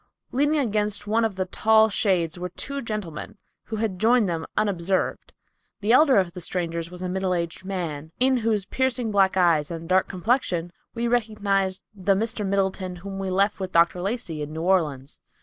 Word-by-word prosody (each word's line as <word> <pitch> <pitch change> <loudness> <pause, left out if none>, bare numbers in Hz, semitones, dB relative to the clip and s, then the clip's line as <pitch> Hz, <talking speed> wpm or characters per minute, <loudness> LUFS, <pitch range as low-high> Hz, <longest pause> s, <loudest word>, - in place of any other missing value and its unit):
Leaning 290 +4 +2
against 210 -6 0
one 220 +2 +1
of 220 -4 0
the 185 0 -1
tall 220 +3 +4
shade 185 -5 +1
trees 175 - -8
were 180 0 -4
two 280 +10 -4
gentlemen, 210 - -5 0.3
who 220 - -5
had 210 -4 -2
joined 230 0 +4
them 165 -2 -3
unobserved. 190 -3 0 0.5
The 210 +2 +1
elder 270 0 +6
of 185 -3 +1
the 180 - -7
strangers 170 -1 -3
was 180 +1 -8
a - - -1
middle 185 0 -1
aged 170 0 -3
man, 160 -5 -4
in 260 +1 +4
whose 220 -4 0
piercing 255 -1 0
black 195 -2 +3
eyes 165 -5 +3
and 165 -1 -6
dark 185 +1 +3
complexion 180 -4 -1 0.2
we 235 +1 -1
recognize 205 -5 0
the 195 -1 +1
Mr. 220 +1 -2
Middleton 190 -2 -1
whom 195 +2 -7
we 195 -1 -2
left 195 +2 +1
with 190 -1 -4
Dr. 170 +1 +3
Lacey 195 -6 -3
in 150 0 -5
New 160 +1 -4
Orleans. 155 -7 0
190 Hz, 185 wpm, -24 LUFS, 175-220 Hz, 0.5 s, elder